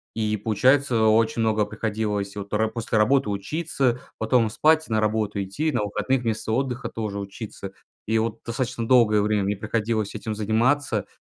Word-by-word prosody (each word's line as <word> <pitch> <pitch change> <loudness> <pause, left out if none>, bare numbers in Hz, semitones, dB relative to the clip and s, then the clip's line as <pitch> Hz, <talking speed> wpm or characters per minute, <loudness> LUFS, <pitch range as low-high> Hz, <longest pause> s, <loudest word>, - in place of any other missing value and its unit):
И 110 -1 0
получается 125 +4 +2
очень 110 +1 +3
много 110 -1 +2
приходилось 105 -2 -3
вот 100 -1 -6
по 105 - 0
ра 110 - +3
после 110 -1 -1
работы 130 0 +3
учиться, 125 - -1 0.2
потом 110 0 +2
спать, 155 +5 +3
на 110 -1 0
работу 105 -1 0
идти, 145 +12 -2
на - - 0
выходных 105 +5 -1
вместо 110 -2 -2
отдыха 125 +1 -1
тоже 105 -3 -4
учиться. 100 0 -7 0.3
И 110 +1 +1
вот 110 0 -2
достаточно 115 -1 -3
долгое 115 -5 +5
время 105 -1 +1
мне 100 +1 0
приходилось 110 0 -1
этим 110 -1 -4
заниматься, 110 +2 +1
110 Hz, 165 wpm, -24 LUFS, 105-120 Hz, 0.3 s, долгое